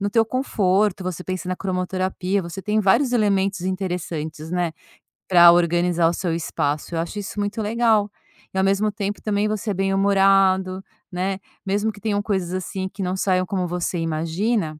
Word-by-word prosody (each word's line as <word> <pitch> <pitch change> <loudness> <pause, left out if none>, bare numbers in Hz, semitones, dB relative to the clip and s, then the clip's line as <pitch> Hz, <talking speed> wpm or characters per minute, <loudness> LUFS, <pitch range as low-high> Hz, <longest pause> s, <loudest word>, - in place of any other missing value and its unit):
no 200 - 0
teu 225 +1 +3
conforto, 210 -5 +1
você 180 -1 -4
pensa 185 -1 -4
na 185 - -2
cromoterapia, 185 +1 -1
você 170 +3 -7
tem 215 0 +1
vários 240 +6 +3
elementos 200 -4 +1
interessantes, 175 -4 -4
né, 175 -2 -1 0.6
para 175 -2 +8
organizar 175 0 +2
o 170 - +1
seu 175 -2 -2
espaço, 155 -1 -2
eu - - 0
acho 170 +5 -3
isso 205 +1 -6
muito 205 +2 -2
legal. 220 -1 +2 0.4
E 190 - -4
ao 190 - +3
mesmo 195 +2 +2
tempo 205 0 -4
também 210 0 0
você 215 0 -2
é - - 0
bem-humorado, 195 -1 +3 0.3
né, 190 +2 -2 0.3
mesmo 205 +3 0
que 205 - -14
tenham 205 0 0
coisas 190 -4 -2
assim 190 +1 -3
que 195 - -8
não 180 0 -1
saiam 185 -1 +1
como 185 -1 -2
você 175 0 -2
imagina 165 +2 -1
190 Hz, 175 wpm, -22 LUFS, 180-205 Hz, 0.6 s, para